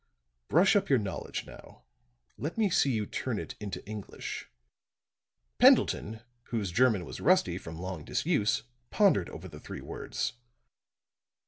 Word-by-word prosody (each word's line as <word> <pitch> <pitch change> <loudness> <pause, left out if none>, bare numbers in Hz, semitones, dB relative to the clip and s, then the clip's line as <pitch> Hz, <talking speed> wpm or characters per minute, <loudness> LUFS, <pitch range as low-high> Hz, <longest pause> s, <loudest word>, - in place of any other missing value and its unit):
Brush 180 +7 +5
up 205 - +2
your 135 - +5
knowledge 100 -4 -4
now; - - -14 0.5
let 155 +8 -4
me 210 -4 +2
see 140 - +3
you 110 -3 0
turn 120 +2 -3
it - - -5
into 100 -3 -6
English." 105 -1 -6 1.1
Pendleton, 110 +1 +4 0.2
whose 105 -6 -2
German 110 -3 +3
was - - -8
rusty - - +3
from 80 0 -8
long 90 -2 -5
disuse, 130 - +1 0.3
pondered 190 - +3
over 90 +4 -8
the 75 -4 -11
three - - -8
words. - - -4
110 Hz, 135 wpm, -30 LUFS, 95-140 Hz, 1.1 s, Brush